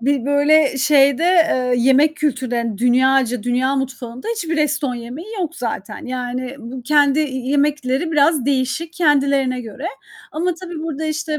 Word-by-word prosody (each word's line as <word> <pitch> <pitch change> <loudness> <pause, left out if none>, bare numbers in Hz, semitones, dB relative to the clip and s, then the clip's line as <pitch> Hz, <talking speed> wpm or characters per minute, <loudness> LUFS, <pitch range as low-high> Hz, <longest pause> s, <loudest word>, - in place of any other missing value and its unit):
bir 270 0 0
böyle 285 0 +3
şeyde, 275 +1 +3
eee, 320 -9 +3
yemek 270 +5 +3
kültürlerin 245 -7 -2
dünyaca 250 -1 +2
dünya 255 +3 0
mutfağında 260 - -5
hiçbir 330 -5 -3
Eston 300 -3 0
yemeği 245 - -8
yok 335 -1 -3
zaten. - - -5
Yani, 250 +1 -4
bu 250 +1 -8
kendi 290 +2 +3
y 305 - +1 0.2
yemekleri 290 +2 0
biraz 295 -2 +3
değişik, 280 +4 -1
kendilerine 280 -5 +1
göre. 245 - -7 0.5
Ama 345 +2 -1
tabii, 340 -2 -8
burada, 315 -1 -4
işte, 310 0 -2
275 Hz, 140 wpm, -19 LUFS, 255-310 Hz, 0.5 s, böyle